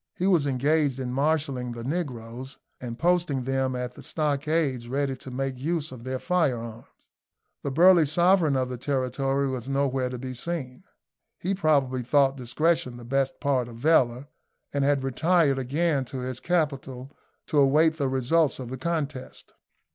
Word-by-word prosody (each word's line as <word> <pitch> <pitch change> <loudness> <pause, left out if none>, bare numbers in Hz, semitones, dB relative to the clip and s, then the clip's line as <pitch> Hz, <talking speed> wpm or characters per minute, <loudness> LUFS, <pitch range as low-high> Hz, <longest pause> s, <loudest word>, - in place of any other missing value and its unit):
He 180 - -2
was 175 -7 +3
engaged 140 +1 +1
in 125 -1 -3
marshalling 140 -3 0
the 120 0 -7
negroes, 130 -4 -5 0.2
and 120 -2 -6
posting 170 -5 +1
them 135 0 -1
at 125 0 -4
the - - -12
stockades 150 -4 -1
ready 135 0 -1
to 130 - -10
make 130 0 -3
use 160 +2 -2
of 125 -3 -10
their 130 0 -2
firearms. 125 -9 -1 0.7
The - - -3
burly 170 +2 +6
sovereign 170 -1 +3
of 130 -1 +1
the 125 -1 -6
territory 135 +1 0
was 130 -1 -4
nowhere 135 -2 0
to 125 - -5
be 130 +1 -6
seen. 130 -2 -5 0.5
He 190 +3 -2
probably 140 -8 +1
thought 135 +2 +3
discretion 140 +1 0
the 120 - -10
best 135 +2 -1
part 130 -4 0
of 120 - -10
valour, 125 -2 +2 0.5
and 140 -1 +1
had 140 -1 +2
retired 145 +1 +2
again 140 +2 0
to 130 +1 -6
his 125 -1 -4
capital, 140 -6 -2 0.3
to 150 - +1
await 155 +4 +4
the 140 -2 +1
results 135 +4 +2
of 125 -3 -7
the 130 - -4
contest. 150 -4 -4
135 Hz, 160 wpm, -26 LUFS, 125-155 Hz, 0.7 s, burly